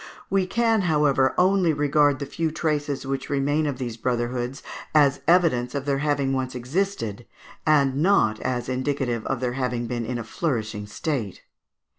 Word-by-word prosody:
We 190 -1 +2
can, 225 0 +2
however, 145 -4 +3
only 185 -2 +3
regard 145 -1 +3
the 140 - -4
few 165 +3 -2
traces 150 -3 -2
which 135 0 -3
remain 145 +2 +1
of 140 -3 -2
these 120 -3 -5
brotherhoods 120 +2 -2 0.3
as 140 -2 +4
evidence 150 -8 +3
of 140 -1 -3
their 140 -1 0
having 145 -2 0
once 130 -1 -2
existed, 125 - -2 0.4
and 140 -3 +3
not 145 - +3
as 125 -1 -2
indicative 130 -3 -1
of 135 -2 -2
their 125 -1 -1
having 125 -2 -2
been 120 -1 -3
in 125 0 -2
a 120 - -4
flourishing 110 -6 -3
state. 110 - -4
135 Hz, 160 wpm, -24 LUFS, 125-150 Hz, 0.4 s, as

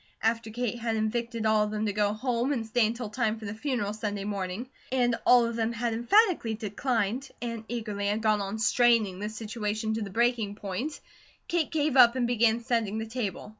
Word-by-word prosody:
After 230 0 +1
Kate 240 +1 -3
had 230 -1 -1
invited 230 +1 -2
all 215 -1 +4
of - - -4
them 215 0 -2
to 205 - -1
go 205 0 +2
home 245 +3 -1
and 235 -5 -1
stay 225 0 +2
until 230 +1 -4
time 220 0 -1
for 220 - -9
the 200 - -4
funeral 220 -3 -2
Sunday 205 -2 -3
morning, 200 +3 -3 0.2
and 245 -2 +2
all 245 -1 +7
of 230 0 -3
them 230 0 0
had 235 0 -1
emphatically 240 - +3
declined, 225 +3 -2
and 230 -2 -5
eagerly 215 -4 -3
had 210 +2 -1
gone 215 -1 +3
on 200 +2 -3
straining 220 -3 +3
the 210 +1 -3
situation 220 0 -3
to 220 - -2
the 205 - -4
breaking 230 -1 +1
point, 215 +9 -4 0.5
Kate 340 -3 0
gave 300 -3 0
up 240 -1 +8
and 250 -2 +1
began 235 -1 +2
setting 230 -4 -1
the 220 - -3
table. 225 -4 -4
225 Hz, 205 wpm, -28 LUFS, 210-240 Hz, 0.5 s, up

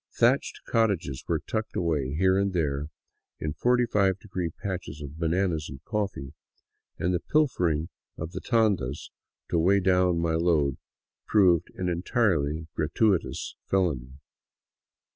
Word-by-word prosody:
Thatched 125 +4 +2
cottages 100 - 0
were - - +1
tucked 110 0 -3
away 75 -5 0
here 95 +3 +3
and 100 -1 0
there 75 -4 -1 0.5
in 75 -1 -2
forty 125 +9 +2
five 100 -4 +2
degree 95 -4 -4
patches 90 -3 -6
of 75 +1 -8
bananas 85 -1 0
and 65 - -8
coffee, 100 - -3 0.6
and 90 +2 0
the 90 - +1
pilfering 85 - +1 0.3
of 80 +1 -5
the 95 - -6
tandas 100 - 0 0.4
to 85 - +3
weigh 95 +4 +4
down 90 -2 +3
my 85 -1 0
load 80 -5 +2 0.5
proved 90 -5 +4
an 90 - -2
entirely 85 -4 +1
gratuitous 95 +4 0
felony. 75 -10 0
90 Hz, 130 wpm, -27 LUFS, 80-100 Hz, 0.6 s, weigh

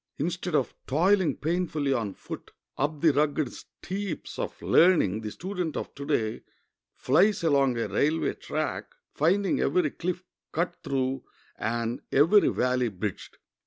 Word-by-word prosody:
Instead 175 +2 -2
of 135 - +1
toiling 185 +6 +3
painfully 155 -3 0
on 110 -6 -2
foot - - -8 0.3
up 145 +2 -1
the 160 -3 +5
rugged 145 -2 +1
steeps 190 -2 -6
of - - -4
learning 155 - +4
the 110 - -4
student 180 - -4
of - - -5
to 140 0 -8
day 110 -1 0 0.5
flies 185 +9 +3
along 140 -6 +3
a 115 - -1
railway 155 +3 +1
track, 155 -3 -4 0.2
finding 190 +6 +2
every 155 0 +2
cliff 180 +1 -3 0.3
cut 175 +2 0
through 135 -3 -1 0.4
and 115 +2 -2
every 165 +9 +5
valley 125 -1 +1
bridged. 100 0 -5
150 Hz, 135 wpm, -27 LUFS, 130-175 Hz, 0.5 s, the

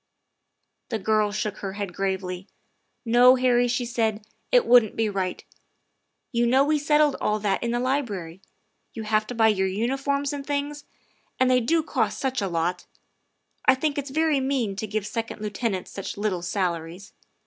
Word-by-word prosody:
The 225 - -1
girl 215 0 +1
shook 210 0 -3
her 195 -1 -5
head 200 -3 -5
gravely. 190 -1 -3 0.3
" - - -49
No, 245 +2 +6
Harry," 245 -1 +3
she 245 0 -1
said, 220 -3 -1
" - - -46
it - - +5
wouldn't 240 -3 +5
be 225 -1 +1
right. 190 -2 -3 0.9
You 235 -1 +2
know 260 +3 +4
we 300 0 +2
settled 295 -1 +3
all 210 - +1
that 205 -2 -1
in 235 - -1
the 240 +1 0
Library. 210 - -2 0.5
You 225 - -5
have 215 0 +1
to 245 - -6
buy 225 -1 +4
your 190 -3 +1
uniforms 270 +8 -1
and 285 -1 -5
things, 290 +1 -3 0.5
and 255 0 +4
they 250 - +5
do 320 +7 +1
cost - - -1
such 260 -2 -1
a 200 - 0
lot. 175 +1 -2 0.8
I 260 - +6
think 285 +2 -1
it's 285 0 -5
very 310 0 +2
mean 260 -7 -1
to 215 - -3
give 215 0 -2
second 225 +1 -4
lieutenants 210 -2 -3
such 195 - -6
little 200 -4 -1
salaries. 175 0 -3
225 Hz, 180 wpm, -25 LUFS, 200-265 Hz, 0.9 s, No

